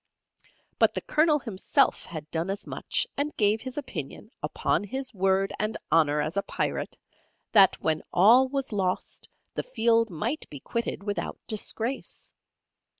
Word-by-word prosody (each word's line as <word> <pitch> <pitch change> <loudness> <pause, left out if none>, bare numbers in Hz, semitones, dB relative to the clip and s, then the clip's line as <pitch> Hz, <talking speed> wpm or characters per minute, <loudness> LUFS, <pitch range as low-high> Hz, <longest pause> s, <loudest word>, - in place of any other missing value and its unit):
But - - +4
the - - -1
Colonel 305 0 +3
himself 225 -9 +1
had 155 -3 -7
done 165 +3 -1
as 195 +1 -3
much, - - 0
and 290 +2 -2
gave 210 +1 +3
his 260 +1 -6
opinion, 210 - -6
upon - - 0
his 260 +5 -4
word 195 0 +1
and 215 +1 -1
honour 150 -2 +3
as 155 +4 -3
a 200 - +2
Pirate, - - -3 0.5
that 195 -3 +6
when 155 -1 +1
all 230 +9 +6
was 270 -3 -3
lost 185 -3 -2 0.2
the - - -1
field 230 - +2
might 225 - -3
be 145 - -8
quitted 230 - -3
without 205 0 -3
disgrace. 225 +3 -2
210 Hz, 150 wpm, -27 LUFS, 185-255 Hz, 0.5 s, that